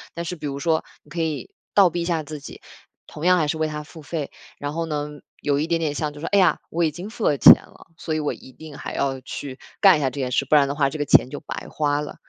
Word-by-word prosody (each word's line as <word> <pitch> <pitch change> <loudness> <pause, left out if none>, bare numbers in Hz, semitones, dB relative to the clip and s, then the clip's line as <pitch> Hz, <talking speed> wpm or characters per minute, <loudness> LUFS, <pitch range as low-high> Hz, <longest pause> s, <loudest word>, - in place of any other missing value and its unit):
但 170 - -3
是 180 - -4
比 150 -3 -5
如 140 -1 -4
说 160 +2 +1 0.2
你 - - -22
可 170 - -2
以 155 -5 -3 0.3
倒 195 -3 +7
逼 175 - -2
一 - - -2
下 165 -3 0
自 150 +1 -7
己， 140 - -11 0.4
同 150 - -7
样 180 0 +6
还 155 - +1
是 160 +2 -1
为 155 - +1
它 150 0 -5
付 160 +2 -13
费。 150 -1 -4 0.3
然 145 +1 -4
后 165 0 -2
呢， 150 -1 -2 0.3
有 145 -1 +1
一 155 - -1
点 170 0 +1
点 155 -3 -1
像 150 0 -2
就 145 - -11
是， 160 - -5
“哎 - - +6
呀， 180 -5 +4
我 170 +1 0
已 160 - +3
经 175 +7 -8
付 225 - -4
了 145 - +3
钱 - - +11
了， - - -10
所 160 -2 -3
以 - - 0
我 150 - -1
一 130 - -13
定 155 +2 -11
还 - - -6
要 135 -1 -1
去 130 +1 -7 0.2
干 195 -5 +7
一 - - -3
下 135 - +2
这 130 - -8
件 130 -2 -2
事， 135 - +1
不 145 - +3
然 145 -2 +5
的 140 - -2
话 140 -2 +2
这 140 - -6
个 145 - -1
钱 130 - +5
就 145 - -6
白 - - -7
花 145 -1 0
了。 150 - -7
150 Hz, 320 characters per minute, -23 LUFS, 145-165 Hz, 0.4 s, 钱